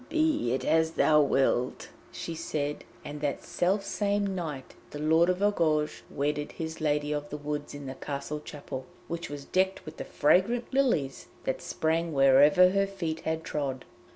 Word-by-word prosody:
'Be 310 Hz, -, +1 dB
it 130 Hz, -, -1 dB
as 160 Hz, 0 st, +2 dB
thou 150 Hz, -2 st, +5 dB
wilt,' 135 Hz, -3 st, +1 dB, 0.2 s
she 165 Hz, -, -5 dB
said, 150 Hz, -3 st, -3 dB, 0.2 s
and 145 Hz, 0 st, -6 dB
that 145 Hz, -2 st, -2 dB
self 195 Hz, +3 st, 0 dB
same 200 Hz, -1 st, 0 dB
night 155 Hz, -8 st, -5 dB, 0.2 s
the -, -, -7 dB
Lord 160 Hz, +3 st, +3 dB
of 180 Hz, +2 st, 0 dB
Argouges 155 Hz, -7 st, +1 dB
wedded 145 Hz, +1 st, -2 dB
his 160 Hz, 0 st, -5 dB
Lady 150 Hz, -1 st, +1 dB
of 150 Hz, 0 st, -3 dB
the 150 Hz, -, -5 dB
Woods 145 Hz, 0 st, -4 dB
in 145 Hz, -1 st, -8 dB
the 130 Hz, -, -5 dB
castle 140 Hz, +2 st, -5 dB
chapel, 140 Hz, -3 st, -7 dB, 0.2 s
which 170 Hz, 0 st, -4 dB
was 145 Hz, -1 st, -7 dB
decked 190 Hz, +1 st, 0 dB
with 155 Hz, 0 st, -9 dB
the -, -, -4 dB
fragrant 230 Hz, -, +2 dB
lilies 240 Hz, -, +1 dB, 0.2 s
that -, -, -2 dB
sprang 165 Hz, +1 st, -1 dB
wherever 145 Hz, +7 st, +6 dB
her 195 Hz, 0 st, +2 dB
feet 170 Hz, -5 st, -4 dB
had 160 Hz, 0 st, -2 dB
trod. 135 Hz, -5 st, -3 dB
155 Hz, 170 wpm, -28 LUFS, 145-180 Hz, 0.2 s, wherever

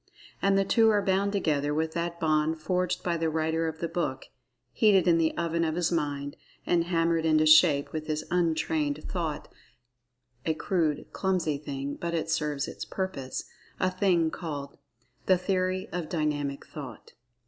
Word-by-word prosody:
And 195 Hz, 0 st, +3 dB
the 195 Hz, -, +2 dB
two 225 Hz, +2 st, +4 dB
are 205 Hz, -2 st, +2 dB
bound 195 Hz, +1 st, +2 dB
together 150 Hz, -7 st, 0 dB
with 160 Hz, +1 st, -1 dB
that 170 Hz, 0 st, -3 dB
bond 155 Hz, 0 st, +1 dB
forged 180 Hz, +2 st, -1 dB
by 170 Hz, -1 st, 0 dB
the 165 Hz, -1 st, 0 dB
writer 160 Hz, +1 st, 0 dB
of 160 Hz, 0 st, -4 dB
the 170 Hz, -, -2 dB
book—heated 135 Hz, -, 0 dB
in 165 Hz, -1 st, +5 dB
the 160 Hz, -1 st, +1 dB
oven 170 Hz, 0 st, 0 dB
of 160 Hz, -1 st, 0 dB
his 175 Hz, -1 st, 0 dB
mind, 145 Hz, -3 st, -2 dB, 0.3 s
and 170 Hz, -1 st, +2 dB
hammered 165 Hz, -1 st, +1 dB
into 155 Hz, -1 st, +3 dB
shape 155 Hz, -2 st, +6 dB
with 155 Hz, -1 st, -4 dB
his 155 Hz, 0 st, -2 dB
"untrained" 160 Hz, -4 st, 0 dB
thought—a 125 Hz, -5 st, -7 dB
crude, 160 Hz, -5 st, 0 dB
clumsy 180 Hz, -7 st, 0 dB
thing, 140 Hz, -1 st, -5 dB
but 170 Hz, 0 st, -3 dB
it 160 Hz, -1 st, -2 dB
serves 150 Hz, -3 st, -1 dB
its -, -, -6 dB
purpose—a 185 Hz, +1 st, -4 dB
thing 180 Hz, -4 st, +2 dB
called 145 Hz, -5 st, -6 dB, 0.5 s
"The 185 Hz, -, +5 dB
Theory 185 Hz, 0 st, -1 dB
of 175 Hz, -3 st, -4 dB
Dynamic 145 Hz, -4 st, -2 dB
Thought." 145 Hz, -4 st, -10 dB
160 Hz, 155 wpm, -28 LUFS, 150-175 Hz, 0.5 s, shape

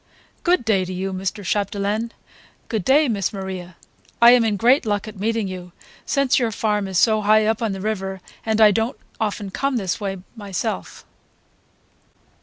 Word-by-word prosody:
"Good 350 Hz, -8 st, +2 dB
day 200 Hz, -4 st, +2 dB
to 185 Hz, -, -6 dB
you, 190 Hz, +1 st, -3 dB
Mr. 195 Hz, +3 st, -3 dB
Chapdelaine. 205 Hz, +3 st, -1 dB, 0.6 s
Good 220 Hz, -5 st, -1 dB
day, 290 Hz, -, +4 dB
Miss 200 Hz, -6 st, -1 dB
Maria. 190 Hz, -3 st, -6 dB, 0.4 s
I 235 Hz, 0 st, +9 dB
am 245 Hz, -1 st, +6 dB
in 215 Hz, -2 st, +1 dB
great 245 Hz, +7 st, +4 dB
luck 205 Hz, -2 st, -1 dB
at 210 Hz, -2 st, -9 dB
meeting 225 Hz, 0 st, 0 dB
you, 180 Hz, -2 st, -8 dB, 0.3 s
since 275 Hz, -2 st, +2 dB
your 235 Hz, -3 st, 0 dB
farm 210 Hz, -2 st, 0 dB
is 190 Hz, -2 st, -2 dB
so 215 Hz, +2 st, +4 dB
high 215 Hz, +1 st, +4 dB
up 220 Hz, 0 st, +1 dB
the 210 Hz, -5 st, -2 dB
river 195 Hz, -2 st, -3 dB, 0.2 s
and 220 Hz, 0 st, 0 dB
I 215 Hz, -1 st, +8 dB
don't 225 Hz, +5 st, -1 dB, 0.2 s
often 205 Hz, -3 st, -2 dB
come 275 Hz, +4 st, -1 dB
this 190 Hz, -3 st, -2 dB
way 195 Hz, -1 st, -3 dB, 0.2 s
myself." 195 Hz, -, -4 dB
210 Hz, 170 wpm, -22 LUFS, 195-225 Hz, 0.6 s, I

